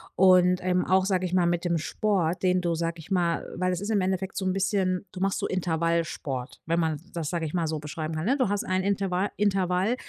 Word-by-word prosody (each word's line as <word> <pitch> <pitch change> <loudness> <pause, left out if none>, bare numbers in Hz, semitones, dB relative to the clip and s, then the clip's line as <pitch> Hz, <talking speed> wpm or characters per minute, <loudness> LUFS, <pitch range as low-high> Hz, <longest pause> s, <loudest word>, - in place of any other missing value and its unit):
und, 180 -1 +5
ähm, 180 0 +1
auch, 190 0 +3
sage 185 -2 +1
ich 180 - -4
mal, 180 -2 +3
mit 175 0 0
dem 170 -1 +1
Sport, 180 0 0
den 180 0 +3
du, 170 -1 0
sage 165 0 -2
ich 160 - -12
mal 175 -3 +1
weil 185 +1 +1
es 180 - -3
ist 205 - -4
im 215 -2 +2
Endeffekt 190 +1 -2
so 190 - -1
'n 185 - +1
bisschen 190 -1 0
du 185 - -8
machst 195 +1 0
so - - -1
Intervallsport, 165 -6 -2
wenn 165 +1 +1
man 160 -3 -1
das, 165 -4 -3
sage 170 -2 -1
ich 150 - -5
mal, 170 -2 +1
so 155 0 -2
beschreiben 155 +2 -5
kann, 155 +1 -3
ne? 265 +6 +2
Du 255 -4 +2
hast 205 0 0
ein 185 0 0
Interva 195 -1 0
Intervall, 195 +1 +1
180 Hz, 245 wpm, -27 LUFS, 170-190 Hz, -, und